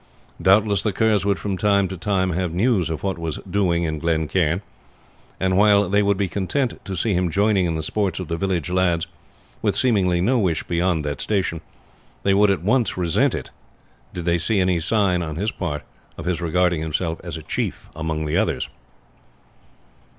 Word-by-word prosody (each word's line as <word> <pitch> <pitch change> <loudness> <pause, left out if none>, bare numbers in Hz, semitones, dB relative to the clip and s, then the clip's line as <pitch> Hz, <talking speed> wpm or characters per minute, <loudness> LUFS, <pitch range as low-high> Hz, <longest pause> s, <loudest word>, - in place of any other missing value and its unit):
Doubtless 100 0 +4
the 105 - -1
Kerrs 105 -2 +2
would 100 -2 +2
from 95 -2 -3
time 100 -2 +3
to 95 - -6
time 95 0 0
have 90 -1 -2
news 95 -4 +2
of 80 -1 -4
what 95 -3 -2
was 80 -2 -3
doing 90 -4 +1
in 80 -2 -2
Glen 80 -1 0
Cairn; 90 +2 0 0.8
and 95 0 +1
while 100 -1 +5
they 100 +3 +3
would 100 -1 +2
be 100 -1 0
content 105 +8 -2
to 95 - -4
see 100 +4 0
him 90 -1 +1
joining 100 0 +2
in 85 - -1
the 80 - -3
sports 95 +1 -1
of 95 - -5
the 85 - -2
village 90 -2 -1
lads, 90 -2 +1 0.6
with - - +1
seemingly 95 -8 +2
no 120 +8 +2
wish 85 -6 0
beyond 85 -2 0
that 70 -2 -3
station, 90 -6 -1 0.6
they 100 - +3
would 105 +1 +4
at 95 -4 0
once 115 +1 +1
resent 85 -3 +2
it - - -6 0.6
did 90 -2 -6
they 85 -1 +2
see 105 +4 +1
any 90 -2 +2
sign 90 0 +1
on 80 -3 -4
his 105 +6 -1
part 75 -6 -4 0.3
of - - -7
his 90 -1 -1
regarding 85 0 +1
himself 80 +1 -2
as 85 -1 -5
a 80 - -9
chief - - -3
among 80 -1 -3
the 75 - -1
others. - - 0
90 Hz, 195 wpm, -22 LUFS, 85-100 Hz, 0.8 s, while